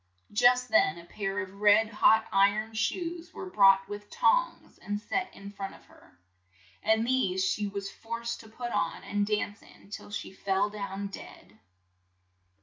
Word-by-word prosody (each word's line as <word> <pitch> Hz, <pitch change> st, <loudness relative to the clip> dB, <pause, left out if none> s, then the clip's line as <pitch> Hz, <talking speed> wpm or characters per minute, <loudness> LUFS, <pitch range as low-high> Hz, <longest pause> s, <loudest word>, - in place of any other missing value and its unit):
Just 250 Hz, +3 st, +4 dB
then 170 Hz, -, +3 dB
a 170 Hz, -, -11 dB
pair 195 Hz, +2 st, -4 dB
of 195 Hz, +2 st, -12 dB
red 210 Hz, +1 st, +6 dB
hot 220 Hz, +1 st, +4 dB
iron 205 Hz, +3 st, +2 dB
shoes 335 Hz, -, -2 dB
were 375 Hz, -1 st, -7 dB
brought 195 Hz, -, +5 dB
with 205 Hz, 0 st, -8 dB
tongs -, -, +1 dB
and 205 Hz, 0 st, -3 dB
set 370 Hz, -, -2 dB
in 200 Hz, 0 st, -9 dB
front 195 Hz, -1 st, -6 dB
of -, -, -19 dB
her, -, -, -21 dB, 0.6 s
and 220 Hz, +1 st, +2 dB
these 195 Hz, -7 st, +1 dB
she 205 Hz, +2 st, 0 dB
was 200 Hz, -1 st, -5 dB
forced 235 Hz, +1 st, -5 dB
to 220 Hz, -, -13 dB
put 240 Hz, +2 st, -6 dB
on 170 Hz, -, -1 dB
and 205 Hz, 0 st, -1 dB
dance 210 Hz, -1 st, -2 dB
in 200 Hz, -, -19 dB
till -, -, -8 dB
she 205 Hz, -2 st, -6 dB
fell 195 Hz, +1 st, 0 dB
down 200 Hz, -1 st, -5 dB
dead. 200 Hz, -, -11 dB
205 Hz, 165 wpm, -29 LUFS, 195-230 Hz, 0.6 s, red